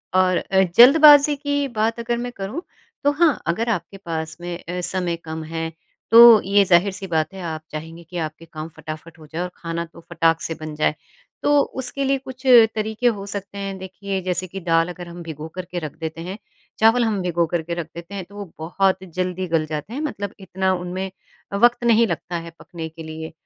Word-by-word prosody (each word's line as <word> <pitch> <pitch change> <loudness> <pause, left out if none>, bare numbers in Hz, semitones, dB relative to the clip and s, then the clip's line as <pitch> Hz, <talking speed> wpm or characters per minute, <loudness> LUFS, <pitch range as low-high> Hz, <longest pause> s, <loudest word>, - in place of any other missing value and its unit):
और 185 -1 +4
अ, 190 0 +2
जल्दबाज़ी 290 +3 +8
की 285 0 -1
बात 225 +2 +1
अगर 235 0 -1
मैं 245 +1 -4
करूँ 205 - -5 0.4
तो 285 - +4
हाँ, 310 0 +2
अगर 225 +8 0
आपके 195 -2 -3
पास 160 -4 -5
में 175 0 -4
अ, 180 +1 -4
समय 180 -1 -1
कम 160 0 -5
है 165 0 -2 0.4
तो 230 -1 +10
ये 200 +1 +4
ज़ाहिर 185 +2 +4
सी 190 0 -7
बात 160 +1 0
है 190 - -8
आप 155 -1 -5
चाहेंगे 160 +2 -7
कि 175 +2 -8
आपके 155 +1 -6
काम 155 -1 -7
फटाफट 155 +2 -8
हो 155 - -13
जाएँ 160 +4 -4
और 180 - -4
खाना 170 0 -4
तो 165 0 -16
फटाक 165 -1 +2
से 165 - -3
बन 155 -1 -5
जाए। 155 0 +1 0.5
तो 290 0 +4 0.2
उसके 270 +2 -4
लिए 275 0 +2
कुछ 260 0 -11 0.3
तरीके 220 +2 0
हो 205 -4 0
सकते 200 0 -6
हैं। 195 -1 -4
देखिए, 190 +1 -5
जैसे 185 0 -2
कि 195 +2 -7
दाल 165 0 +2
अगर 175 0 -8
हम 170 0 -9
भिगो 160 -1 -7
करके 180 -1 -4
रख 155 -4 -6
देते 160 0 -5
हैं, 185 +4 -6 0.4
चावल 225 +2 +5
हम 210 -4 0
भिगो 175 -1 +1
करके 170 0 -1
रख 170 -2 -4
देते 170 +3 -9
हैं 195 - -4
तो 200 - -17
वो 205 0 -6
बहुत 185 +4 +1
जल्दी 185 +1 -3
गल 160 -1 +3
जाते 155 +7 -5
हैं। 280 - -3
मतलब 205 -10 -4
इतना 190 0 -1
उनमें 185 +1 -4 0.4
वक़्त 240 +4 +4
नहीं 235 -1 +5
लगता 175 -1 -4
है 165 0 -8
पकने 165 -2 -7
के 160 +1 -10
लिए। 160 0 -7
185 Hz, 210 wpm, -22 LUFS, 165-215 Hz, 0.5 s, तो